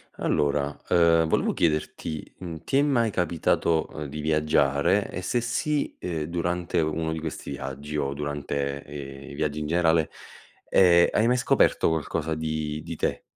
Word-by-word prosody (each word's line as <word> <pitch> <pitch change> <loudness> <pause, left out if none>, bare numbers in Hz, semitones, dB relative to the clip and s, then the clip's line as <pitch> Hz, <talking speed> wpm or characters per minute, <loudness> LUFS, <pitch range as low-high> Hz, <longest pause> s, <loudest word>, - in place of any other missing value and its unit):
Allora, 70 0 0
uhm, 85 -2 +5
volevo - - +1
chiederti: 75 -1 -2
mhmm, 85 -3 -6
ti 135 - +1
è - - +5
mai 120 -7 +2
capitato, 85 -2 +1
uhm, 75 - -5
di 75 +2 -7
viaggiare? 75 +3 +2
E, - - -5
se 120 +6 0
sì, 145 +5 -1
ehm, 85 -4 -3
durante 85 +1 -1
uno 80 +1 -1
di 80 - -4
questi 80 -1 -6
viaggi 70 +3 -6
o 70 -2 -1
durante, 70 -1 -3
ehm, 70 -1 -9
i - - -9
viaggi 75 0 -1
in 75 - -3
generale, 80 -1 +2 0.6
ehm, 85 -2 +6
hai 110 - +2
mai 125 +1 +3
scoperto - - +3
qualcosa 80 0 -1
di 80 -1 -3
di 85 -1 -6
te? - - -1
80 Hz, 160 wpm, -26 LUFS, 75-85 Hz, 0.6 s, ehm